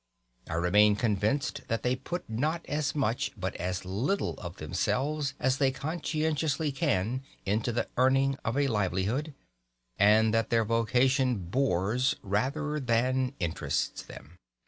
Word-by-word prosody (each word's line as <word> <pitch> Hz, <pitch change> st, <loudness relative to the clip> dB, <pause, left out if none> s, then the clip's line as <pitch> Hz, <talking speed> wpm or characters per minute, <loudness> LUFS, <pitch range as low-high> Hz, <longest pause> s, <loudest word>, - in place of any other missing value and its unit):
I 80 Hz, -, -2 dB
remain 105 Hz, +5 st, +4 dB
convinced 110 Hz, +5 st, 0 dB
that 115 Hz, -, -2 dB
they 125 Hz, +1 st, +2 dB
put 175 Hz, +7 st, -5 dB
not 150 Hz, +9 st, -1 dB
as 145 Hz, -1 st, -1 dB
much 135 Hz, 0 st, 0 dB
but 95 Hz, -1 st, -3 dB
as 90 Hz, +1 st, -3 dB
little 120 Hz, -, -1 dB
of 85 Hz, 0 st, -7 dB
themselves 135 Hz, -, -1 dB
as 130 Hz, +1 st, +1 dB
they 135 Hz, -2 st, +4 dB
conscientiously 155 Hz, +1 st, -1 dB
can 130 Hz, -, 0 dB, 0.2 s
into 105 Hz, +4 st, 0 dB
the 120 Hz, -, -1 dB
earning 135 Hz, +1 st, +3 dB
of 115 Hz, +3 st, -1 dB
a 145 Hz, -1 st, +3 dB
livelihood, 110 Hz, -, -1 dB, 0.6 s
and 110 Hz, +2 st, +5 dB
that 115 Hz, -1 st, +1 dB
their 115 Hz, -1 st, +2 dB
vocation 125 Hz, +3 st, +2 dB
bores 110 Hz, +4 st, 0 dB
rather 140 Hz, +10 st, -1 dB
than 130 Hz, +1 st, +1 dB
interests 85 Hz, -4 st, -2 dB
them. 75 Hz, +7 st, -13 dB
125 Hz, 135 wpm, -29 LUFS, 105-140 Hz, 0.6 s, and